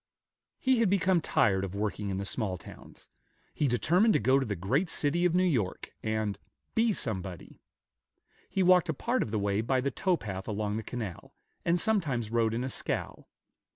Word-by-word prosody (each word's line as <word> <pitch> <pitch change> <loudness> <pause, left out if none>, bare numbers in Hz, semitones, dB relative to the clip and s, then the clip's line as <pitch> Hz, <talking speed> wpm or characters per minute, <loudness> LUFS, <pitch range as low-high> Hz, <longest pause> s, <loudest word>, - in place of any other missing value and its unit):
He 260 -2 +2
had 225 -4 +3
become 190 -2 +3
tired 110 -13 +2
of 95 0 -5
working 105 0 -2
in 95 - -2
the 100 - -3
small 95 -3 -2
towns; - - -13 0.5
he 150 - +1
determined 175 - +3
to - - +4
go 130 +5 +4
to 135 - -1
the 100 - -2
great 130 - 0
city 165 +4 +1
of 175 -1 +2
New 185 - +4
York, 120 - -1
and 110 -2 -2 0.3
"be 225 0 +3
somebody." 95 - -4 0.9
He 190 - +1
walked 180 -1 +5
a 160 - 0
part 245 - 0
of - - -1
the 110 - -1
way 100 0 0
by 130 +3 +1
the 140 +2 -1
tow 185 +6 +1
path 95 -6 -6
along 105 -1 -2
the - - -2
canal, 110 -6 -6 0.3
and 170 +1 +2
sometimes 145 - 0
rode 115 -1 +2
in 120 - -1
a 130 - -2
scow. - - -4
120 Hz, 190 wpm, -29 LUFS, -, 0.9 s, walked